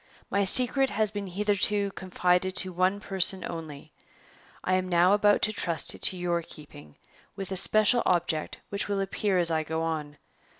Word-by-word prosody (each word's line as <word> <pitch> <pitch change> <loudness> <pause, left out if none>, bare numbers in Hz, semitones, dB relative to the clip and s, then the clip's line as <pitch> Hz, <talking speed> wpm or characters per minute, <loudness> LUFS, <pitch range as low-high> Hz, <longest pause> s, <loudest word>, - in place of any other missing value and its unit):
My 200 0 0
secret 255 +6 +6
has 215 -1 -1
been 205 -2 -6
hitherto 205 +1 -1
confided 185 0 -2
to 185 -2 -1
one 185 +3 -1
person 190 -2 +1
only; 155 -4 -10 0.7
I 185 - -2
am 185 0 -1
now 175 +2 +2
about 205 0 +1
to 215 - 0
trust 170 -6 -1
it - - -14
to 185 - +3
your 175 -1 -2
keeping, 145 - -14 0.4
with 195 -1 -8
a - - -3
special 215 +5 +4
object 170 -3 -2
which 200 0 -4
will 200 -1 -3
appear 195 0 -2
as 170 -2 +2
I 160 -1 -1
go 160 +1 -5
on. 150 -3 -5
185 Hz, 175 wpm, -26 LUFS, 170-205 Hz, 0.7 s, secret